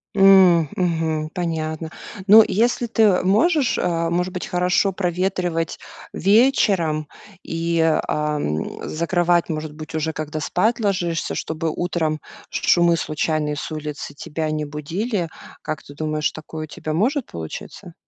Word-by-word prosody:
М, 190 -5 +6
мгм. 160 -3 -1
Понятно. 160 -3 -3 0.4
Ну 215 +2 +9
если 235 +5 +1
ты, 225 0 0
э, 190 -4 +4
можешь, 275 - +3
э, 165 -2 0
может 180 +2 0
быть, 180 - -4
хорошо 180 +2 +1
проветривать 180 -2 -1 0.3
вечером 195 - +3 0.3
и, 165 0 -2
а, 150 -1 +1
м, 75 - -3
закрывать, 175 +1 +1
может 155 -1 -4
быть, 155 +1 -8
уже 160 +1 -1
когда 155 0 -4
спать 215 +10 +1
ложишься, 180 -6 -1
чтобы 160 0 -3
утром 160 -3 -1 0.3
шумы 170 -1 +3
случайные 155 -1 -1
с 150 - -6
улицы 150 -2 -5
тебя 155 +2 -4
не 155 0 -2
будили? 170 +6 -3 0.3
Как 155 - -4
ты 145 - -13
думаешь 155 0 -1
такое 155 0 -7
у - - -18
тебя 155 +1 -5
может 250 - +1
получиться? 80 -1 -8
165 Hz, 135 wpm, -22 LUFS, 155-185 Hz, 0.4 s, Ну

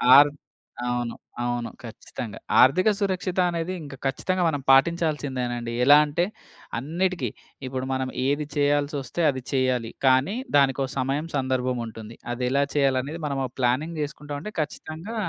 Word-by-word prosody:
Are 145 +1 +9 0.6
అవును. 120 -1 -1 0.3
అవును. 120 -1 -1
ఖచ్చితంగా 110 -1 -7 0.2
ఆర్థిక 185 - +5
సురక్షిత 185 -2 -1
అనేది 170 +2 -2
ఇంక 140 -2 -8
ఖచ్చితంగా 180 +7 0
మనం 145 -3 0
పాటించాల్సిందేనండి. 135 -6 +1
ఎలా 145 +3 +8
అంటే 160 +4 0 0.5
అన్నిటికి 175 +7 -1 0.4
ఇప్పుడు 130 0 -3
మనం 130 0 -1 0.2
ఏది 145 +2 +1
చేయాల్సొస్తే 145 +1 0
అది 130 -2 -2
చెయ్యాలి. 130 -4 +1 0.2
కానీ 130 - +4 0.2
దానికొ 135 -1 +4
సమయం 140 +5 -1
సందర్భముంటుంది. 125 -4 -2 0.2
అదెలా 125 +3 +1
చేయాలనేది 140 +2 +1
మనము 140 -2 -1
ఒక 125 - -7
ప్లానింగ్ 145 +6 0
చేసుకుంటామంటే 150 +4 -5
ఖచ్చితంగా 160 +7 -5
140 Hz, 120 wpm, -25 LUFS, 130-155 Hz, 0.6 s, Are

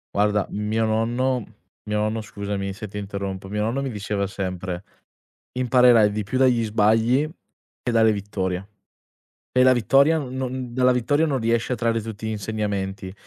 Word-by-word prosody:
Guarda, 105 -1 +2
mio 110 +2 0
nonno 120 +3 0 0.4
mio 105 0 -1
nonno 110 +1 -1
scusami 100 -1 -4
se 105 +1 -7
ti 105 - -8
interrompo, 100 -1 -5
mio 105 +1 -1
nonno 120 +5 -1
mi 135 - -2
diceva 100 -2 -2
sempre: 95 -2 -4 0.7
"Imparerai 125 -4 +5
di 105 +1 -2
più 105 +6 -3
dagli 125 -3 +3
sbagli 110 +6 +2 0.5
che 125 - -2
dalle 110 -1 +4
vittorie". 100 -2 -3 0.9
E 125 - +4
la 130 - +7
vittoria 135 +7 +4
non 140 -5 -4
non 130 -1 -4
dalla 125 +1 +3
vittoria 145 +6 +2
non 140 -3 0
riesci 115 +2 0
a - - +3
trarre 115 -1 0
tutti 110 0 -7
gli - - -1
insegnamenti. 100 -3 -3
110 Hz, 165 wpm, -23 LUFS, 100-125 Hz, 0.9 s, la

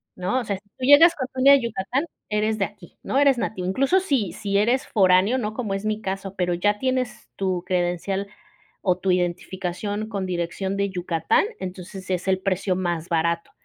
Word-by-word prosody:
No, 185 +8 -1
o - - -3
sea, 200 -3 -2
si 205 +1 -23
tú 255 - -3
llegas 320 +5 +8
con 260 -3 -3
tu 260 - -5
INE 275 +2 +7
a - - +10
Yucatán, 240 - -1 0.2
eres 215 +1 0
de 195 - +1
aquí, 195 -5 -14
¿no? - - -1
eres 275 -3 +5
nativo, 185 -6 -3
incluso 270 - +2
si 265 - 0
si 200 0 -1
eres 240 +6 +2
foráneo, 190 +4 +4
¿no?, 215 -3 -2
como 220 -4 -3
es 195 +2 -3
mi 215 0 -1
caso, 195 -1 -4
pero 180 -2 0
ya 205 +4 +1
tienes 255 0 -2
tu 185 -3 -1
credencial 180 +2 -1 0.5
o 180 -2 +1
tu 185 0 0
identificación 185 +3 -2
con 200 -3 -3
dirección 180 +2 -2
de 200 0 0
Yucatán, 175 - +1
entonces 185 +1 -7
es 185 0 -2
el 190 -1 +2
precio 190 0 0
más 175 -3 -2
barato. 170 0 0
195 Hz, 200 wpm, -24 LUFS, 180-220 Hz, 0.5 s, a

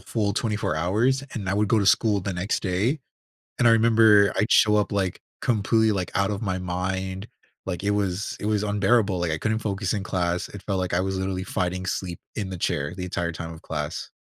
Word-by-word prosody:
full 105 -3 -1
24 105 -6 -1
hours, 110 - +1
and 100 -5 -4
I 95 - +1
would 105 0 +1
go 110 - +3
to 100 - +1
school 105 -1 +3
the 95 +1 -3
next 90 +4 -1
day, 105 - 0 0.6
and 120 - +5
I - - +7
remember, 110 -3 +5
I'd 105 - +1
show 105 0 +5
up, 105 - 0
like, 95 -3 -1 0.2
completely, 110 -1 +2
like, 95 -4 -2
out 100 +1 +2
of 100 - -3
my 95 -4 -1
mind, 95 +2 -3 0.4
like, 90 -1 -4
it 100 - +1
was 100 -1 -1
it - - -5
was 105 -1 +1
unbearable, 105 -1 +2
like, 85 -2 0
I 80 - -1
couldn't 110 +6 -1
focus 100 -3 -2
in 100 -3 -2
class, 90 -2 -1
it 100 - -9
felt 100 -2 -1
like 90 -2 -2
I 85 - +3
was 95 0 -2
literally 95 0 -2
fighting 95 0 -2
sleep 90 -2 -3 0.2
in 100 -3 -3
the 95 - -5
chair 70 -3 -1
the 90 - -5
entire 85 -1 -2
time 85 0 -6
of 80 - -12
class. 75 -2 -4
95 Hz, 225 wpm, -25 LUFS, 90-105 Hz, 0.6 s, I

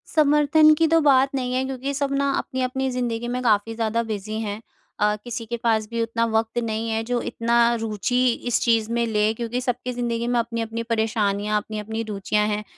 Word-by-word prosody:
समर्थन 305 +1 +5
की 325 +1 +3
तो 330 +1 +4
बात 275 -2 +4
नहीं 250 -1 -2
है 255 - +1
क्योंकि 270 +1 -4
सब 275 0 -1
ना 280 0 +1
अपनी-अपनी 260 +1 -2
ज़िंदगी 240 -2 -2
में 250 +1 -2
काफ़ी 220 0 +2
ज़्यादा 230 +1 0
बिज़ी 215 0 -4
हैं। 210 0 -4 0.4
अ, 210 0 +2
किसी 240 -1 -5
के 235 +2 -4
पास 220 -2 +1
भी 230 0 -2
उतना 230 0 0
वक़्त 225 +1 0
नहीं 225 0 -2
है 225 0 -1
जो 240 +1 -1
इतना 235 +1 +1 0.2
रुचि 225 +3 0 0.2
इस 240 - +2
चीज़ 230 -1 +2
में 235 0 +1
लें 215 0 +1
क्योंकि 240 +2 -3
सबकी 250 0 -2
ज़िंदगी 235 -1 -2
में 240 0 +1
अपनी-अपनी 230 0 -3
परेशानियाँ, 215 -2 0
अपनी-अपनी 215 +1 -4
रुचियाँ 210 +1 0
हैं। 210 0 -2
230 Hz, 195 wpm, -23 LUFS, 220-250 Hz, 0.4 s, समर्थन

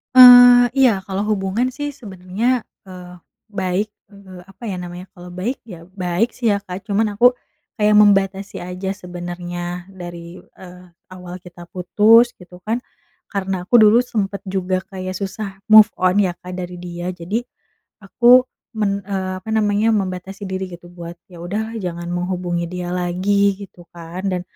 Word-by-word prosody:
Eee, 245 -1 +10
iya, 250 -8 +4
kalau 195 +1 -2
hubungan 210 +6 -1
sih 290 +2 -5
sebenernya, 215 +3 -2 0.2
eee, 180 -2 -11 0.3
baik, 195 0 -2 0.2
eee, 190 -3 -13
apa 195 +5 -18
ya 195 - -3
namanya 180 +1 -8
kalau 175 0 -11
baik 205 +10 -4
ya 175 -6 -12
baik 185 +4 -2
sih 230 -4 +1
ya, 200 - +1
Kak 190 -1 -8
cuman 210 0 -1
aku 245 +4 +6 0.5
kayak 210 0 +4
membatasi 195 -1 +3
aja 180 +2 -5
sebenernya 175 -1 -6
dari, 175 -2 -10
eee, 180 0 -15 0.3
awal 180 0 -9
kita 175 -1 -13
putus 220 +6 +4
gitu 180 0 -15
kan 235 +3 -1 0.5
karena 190 -3 -3
aku 235 +5 +4
dulu 220 +3 +6
sempet 200 -5 -3
juga 185 -1 -2
kayak 185 -2 -7
susah 195 +1 -5 0.2
move 215 0 +10
on 185 +2 +2
ya, 180 -3 +1
Kak 180 +1 -8
dari 180 0 -6
dia. 175 0 -7
Jadi 180 +6 -3 0.6
aku 245 +5 +4 0.3
men 200 -1 0
eee, 185 -1 -4
apa 220 - -7
namanya 215 0 +2
membatasi 195 -1 -3
diri 190 0 -4
gitu 175 0 -11
buat 175 -1 -10
ya 175 -2 -12
udahlah 220 +6 -4
jangan 170 -1 -5
menghubungi 175 -1 -2
dia 180 -1 -5
lagi 195 +3 +1
gitu 190 -3 -12
kan 170 +2 -9
dan 180 -1 -2
190 Hz, 155 wpm, -19 LUFS, 180-210 Hz, 0.6 s, Eee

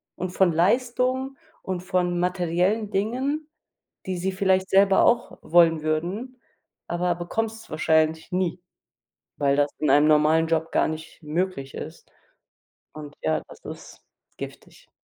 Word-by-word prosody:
und 180 0 -4
von 185 -1 +3
Leistung 250 +8 +1 0.3
und 185 -2 -3
von 180 -1 0
materiellen 180 +4 0
Dingen, 265 +10 -1 0.6
die 185 - -2
sie 190 +2 -1
vielleicht 190 0 +1
selber 195 0 +5
auch 235 0 +1
wollen 165 -1 +4
würden, 180 +12 -3 0.5
aber 175 +1 0
bekommst's 225 +5 -4
wahrscheinlich 160 0 +1
nie, 180 -1 -1 0.8
weil 140 -1 +2
das 145 0 +2
in 155 - 0
einem 145 +2 +5
normalen 155 +2 +4
Job 165 0 0
gar - - +2
nicht 160 +1 -8
möglich 155 -3 -3
ist, - - -9 0.8
und 150 -1 -10
ja, 80 -1 +1
das - - -15
ist - - -10 0.3
giftig. - - -10
180 Hz, 130 wpm, -24 LUFS, 160-200 Hz, 0.8 s, selber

